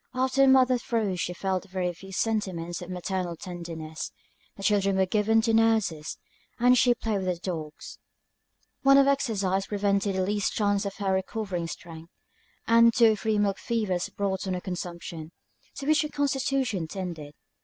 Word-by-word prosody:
After 260 Hz, +1 st, +1 dB
the 270 Hz, -, +6 dB
mother's 255 Hz, -2 st, +5 dB
throes 210 Hz, -8 st, -1 dB
she 180 Hz, -, -1 dB
felt 190 Hz, +1 st, -3 dB
very 180 Hz, -1 st, -2 dB
few 195 Hz, +3 st, -12 dB
sentiments 185 Hz, -5 st, -2 dB
of 175 Hz, -, -8 dB
maternal 180 Hz, -1 st, -3 dB
tenderness: 165 Hz, -3 st, -7 dB, 0.5 s
the 195 Hz, -, -8 dB
children 200 Hz, -2 st, +2 dB
were 190 Hz, -, +3 dB
given 215 Hz, +3 st, +2 dB
to 225 Hz, -1 st, +1 dB
nurses, 220 Hz, -9 st, +1 dB, 0.4 s
and 245 Hz, +1 st, +5 dB
she 245 Hz, 0 st, +4 dB
played 220 Hz, -4 st, -2 dB
with 185 Hz, -, -4 dB
her 180 Hz, -, +1 dB
dogs. 165 Hz, -4 st, -6 dB, 0.8 s
Want 275 Hz, 0 st, +7 dB
of 275 Hz, -, +6 dB
exercise 200 Hz, -9 st, 0 dB
prevented 200 Hz, -1 st, 0 dB
the 190 Hz, -, +1 dB
least 205 Hz, 0 st, 0 dB
chance 205 Hz, -1 st, +1 dB
of 200 Hz, -, -6 dB
her 195 Hz, -2 st, -1 dB
recovering 190 Hz, -2 st, -2 dB
strength; 165 Hz, 0 st, -9 dB, 0.6 s
and 230 Hz, 0 st, +6 dB
two 230 Hz, -1 st, +5 dB
or -, -, +1 dB
three 215 Hz, +1 st, -1 dB
milk 200 Hz, -1 st, +1 dB
fevers 210 Hz, -7 st, -1 dB
brought 195 Hz, -1 st, -2 dB
on 185 Hz, -, -1 dB
a -, -, -2 dB
consumption, 170 Hz, -3 st, -6 dB, 0.5 s
to 275 Hz, -, -6 dB
which 310 Hz, +1 st, +4 dB
her 300 Hz, -, -3 dB
constitution 270 Hz, -, -1 dB
tended. 160 Hz, -5 st, -6 dB
195 Hz, 170 wpm, -27 LUFS, 180-225 Hz, 0.8 s, Want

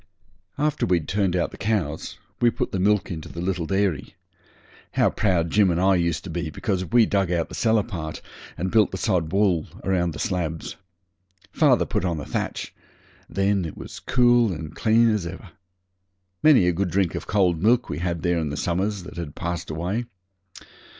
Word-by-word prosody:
After 150 Hz, 0 st, 0 dB
we'd 85 Hz, -4 st, +1 dB
turned 95 Hz, -2 st, 0 dB
out 90 Hz, -, 0 dB
the -, -, -12 dB
cows 100 Hz, -8 st, -2 dB, 0.2 s
we 120 Hz, -, +6 dB
put -, -, -3 dB
the 95 Hz, -, -2 dB
milk 105 Hz, +1 st, +2 dB
into 80 Hz, -3 st, -6 dB
the 85 Hz, -, -8 dB
little 90 Hz, -2 st, -2 dB
dairy. 95 Hz, -6 st, -1 dB, 0.8 s
How -, -, +3 dB
proud 85 Hz, -5 st, +1 dB
Jim 105 Hz, -2 st, +4 dB
and 85 Hz, 0 st, +1 dB
I 95 Hz, +1 st, +4 dB
used 85 Hz, -3 st, 0 dB
to 90 Hz, -, -7 dB
be 85 Hz, -1 st, -3 dB
because 95 Hz, +3 st, -2 dB
we 120 Hz, +3 st, +4 dB
dug 100 Hz, -4 st, 0 dB
out 85 Hz, -2 st, 0 dB
the -, -, -11 dB
cellar 110 Hz, -2 st, +2 dB
part, 85 Hz, -8 st, -6 dB, 0.4 s
and 95 Hz, +2 st, -2 dB
built 110 Hz, -3 st, +4 dB
the 95 Hz, -, -5 dB
sod 90 Hz, -6 st, 0 dB
wall 95 Hz, -5 st, +2 dB, 0.2 s
round 90 Hz, -3 st, 0 dB
the -, -, -8 dB
slabs! 85 Hz, -7 st, -3 dB, 0.8 s
Father -, -, +3 dB
put -, -, -2 dB
on 85 Hz, -3 st, -1 dB
the 75 Hz, -, -5 dB
thatch; -, -, -4 dB, 0.6 s
then 100 Hz, 0 st, +1 dB
it 80 Hz, -, -6 dB
was -, -, -9 dB
as -, -, -8 dB
cool 120 Hz, -3 st, +3 dB
and 80 Hz, -2 st, -6 dB
clean 115 Hz, +1 st, +4 dB
as 100 Hz, -5 st, -2 dB
ever. 95 Hz, +1 st, -9 dB, 0.9 s
Many 135 Hz, -13 st, +6 dB
a -, -, +4 dB
good 95 Hz, +2 st, -1 dB
drink 95 Hz, 0 st, +1 dB
of -, -, -5 dB
cold 90 Hz, -6 st, +2 dB
milk 120 Hz, +4 st, +3 dB
we 75 Hz, -, -4 dB
had 85 Hz, -2 st, -2 dB
there 85 Hz, -1 st, +1 dB
in 80 Hz, -2 st, -2 dB
the 75 Hz, -, -4 dB
summers 95 Hz, +4 st, -1 dB
that 90 Hz, -, -10 dB
had 80 Hz, -4 st, -6 dB
passed 85 Hz, 0 st, -4 dB
away. 90 Hz, +9 st, -2 dB
90 Hz, 195 wpm, -24 LUFS, 85-105 Hz, 0.9 s, we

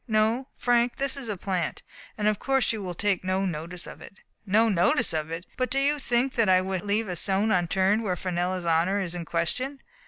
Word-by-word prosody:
No, 220 Hz, +4 st, +1 dB
Frank, 240 Hz, 0 st, +2 dB
this 275 Hz, 0 st, 0 dB
is 270 Hz, -5 st, -5 dB
a 205 Hz, -, -2 dB
plant; 185 Hz, -2 st, -2 dB, 0.3 s
and 210 Hz, -1 st, 0 dB
of 215 Hz, -2 st, +1 dB
course 270 Hz, -3 st, +1 dB
you 220 Hz, -, -4 dB
will 180 Hz, -2 st, -5 dB
take 200 Hz, 0 st, 0 dB
no 185 Hz, +1 st, 0 dB
notice 170 Hz, 0 st, -4 dB
of -, -, -10 dB
it." 200 Hz, -, -12 dB, 0.3 s
"No 220 Hz, +4 st, +4 dB
notice 195 Hz, +3 st, +3 dB
of 155 Hz, -1 st, -2 dB
it! 165 Hz, +2 st, -5 dB
But 255 Hz, 0 st, 0 dB
do 270 Hz, -, -1 dB
you 285 Hz, +2 st, +2 dB
think 250 Hz, 0 st, +1 dB
that 230 Hz, -5 st, +2 dB
I 185 Hz, 0 st, +6 dB
would 185 Hz, -1 st, -2 dB
leave 210 Hz, +3 st, 0 dB
a 180 Hz, -, -3 dB
stone 200 Hz, +4 st, 0 dB
unturned 190 Hz, +4 st, +2 dB
where 190 Hz, -5 st, -1 dB
Fenella's 180 Hz, 0 st, -2 dB
honor 170 Hz, +4 st, +2 dB
is 180 Hz, -3 st, -3 dB
in 175 Hz, -1 st, -5 dB
question?" 250 Hz, -, -2 dB
195 Hz, 220 wpm, -26 LUFS, 180-230 Hz, 0.3 s, I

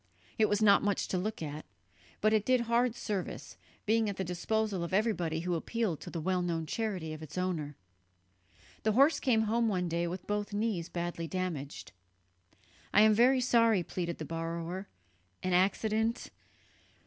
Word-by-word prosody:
It 215 Hz, -, +4 dB
was 205 Hz, +1 st, +2 dB
not 200 Hz, -1 st, +6 dB
much 205 Hz, -1 st, 0 dB
to 185 Hz, -, 0 dB
look 210 Hz, -1 st, -3 dB
at, 150 Hz, 0 st, -5 dB, 0.6 s
but 215 Hz, +1 st, +3 dB
it 215 Hz, -2 st, +3 dB
did 255 Hz, +1 st, +3 dB
hard 235 Hz, 0 st, +1 dB
service, 205 Hz, -5 st, -4 dB, 0.3 s
being 220 Hz, 0 st, +2 dB
at 200 Hz, -, -5 dB
the 190 Hz, -, -1 dB
disposal 195 Hz, +2 st, -1 dB
of 170 Hz, +2 st, -2 dB
everybody 175 Hz, -7 st, 0 dB
who 175 Hz, +1 st, -1 dB
appealed 185 Hz, 0 st, -1 dB
to -, -, -8 dB
the 170 Hz, -, -4 dB
well 180 Hz, +3 st, 0 dB
known 165 Hz, -2 st, -1 dB
charity 185 Hz, -4 st, -3 dB
of 155 Hz, -, -8 dB
its 155 Hz, +2 st, -9 dB
owner. 165 Hz, -6 st, -2 dB, 1.1 s
The 215 Hz, -, +1 dB
horse 280 Hz, +7 st, +5 dB
came 230 Hz, -5 st, +2 dB
home 230 Hz, +2 st, +1 dB
one 180 Hz, -4 st, 0 dB
day 170 Hz, +1 st, -1 dB
with 180 Hz, +2 st, -5 dB
both 205 Hz, 0 st, -2 dB
knees 205 Hz, -5 st, -1 dB
badly 170 Hz, -1 st, -3 dB
damaged. 165 Hz, -6 st, -4 dB, 1.0 s
"I 210 Hz, -, +6 dB
am 215 Hz, 0 st, +6 dB
very 255 Hz, +4 st, +4 dB
sorry," 230 Hz, -6 st, +4 dB
pleaded 170 Hz, -1 st, -4 dB
the 155 Hz, -, -5 dB
borrower, 165 Hz, +4 st, -4 dB, 0.6 s
"an 185 Hz, -, 0 dB
accident 215 Hz, +5 st, +1 dB
190 Hz, 170 wpm, -31 LUFS, 170-220 Hz, 1.1 s, not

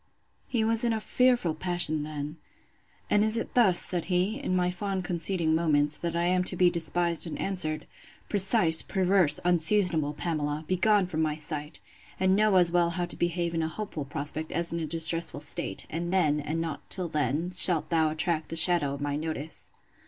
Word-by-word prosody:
He 235 Hz, -3 st, -1 dB
was 225 Hz, +1 st, 0 dB
in 235 Hz, -1 st, +1 dB
a 220 Hz, -, -2 dB
fearful 245 Hz, -6 st, +1 dB
passion 165 Hz, -2 st, +1 dB
then. 150 Hz, +1 st, -7 dB, 0.7 s
And 210 Hz, 0 st, +2 dB
is 220 Hz, +1 st, +4 dB
it 230 Hz, -, -5 dB
thus, 205 Hz, -8 st, +3 dB
said 175 Hz, -3 st, +3 dB
he, 190 Hz, +6 st, -1 dB
in 230 Hz, -10 st, -3 dB
my 180 Hz, 0 st, 0 dB
fond 190 Hz, 0 st, -4 dB
conceding 170 Hz, -2 st, -1 dB
moments, 150 Hz, -2 st, +2 dB
that 170 Hz, -1 st, -4 dB
I 170 Hz, -, -1 dB
am 180 Hz, +1 st, +1 dB
to 185 Hz, -, +2 dB
be 180 Hz, 0 st, +3 dB
despised 170 Hz, 0 st, +2 dB
and 165 Hz, -, -6 dB
answered?—Precise, 185 Hz, +1 st, +2 dB
perverse, 185 Hz, -6 st, +2 dB
unseasonable 170 Hz, -3 st, +3 dB
Pamela! 150 Hz, -2 st, -4 dB
begone 195 Hz, +2 st, +2 dB
from 160 Hz, -3 st, -4 dB
my 155 Hz, -1 st, -1 dB
sight! 150 Hz, 0 st, -5 dB, 0.4 s
and 190 Hz, 0 st, +2 dB
know 210 Hz, -1 st, +2 dB
as 175 Hz, -2 st, +3 dB
well 175 Hz, -1 st, +1 dB
how 175 Hz, +1 st, -3 dB
to -, -, -3 dB
behave 175 Hz, 0 st, -2 dB
in 165 Hz, -, -2 dB
a 160 Hz, -, -2 dB
hopeful 160 Hz, -4 st, -7 dB
prospect, 150 Hz, +2 st, -4 dB
as 170 Hz, +1 st, +1 dB
in 170 Hz, -, -3 dB
a 160 Hz, -, -4 dB
distressful 165 Hz, +1 st, +1 dB
state; -, -, -3 dB
and 170 Hz, +2 st, -5 dB
then, 155 Hz, -6 st, +1 dB
and 150 Hz, +3 st, -4 dB
not 165 Hz, -3 st, -6 dB
till 185 Hz, -2 st, -2 dB
then, 150 Hz, +3 st, -2 dB
shalt 175 Hz, -3 st, 0 dB
thou 160 Hz, -2 st, +2 dB
attract 155 Hz, 0 st, -3 dB
the -, -, -5 dB
shadow 160 Hz, -4 st, +3 dB
of 140 Hz, -, -10 dB
my 145 Hz, 0 st, -3 dB
notice. 155 Hz, 0 st, -4 dB
170 Hz, 190 wpm, -26 LUFS, 155-185 Hz, 0.7 s, is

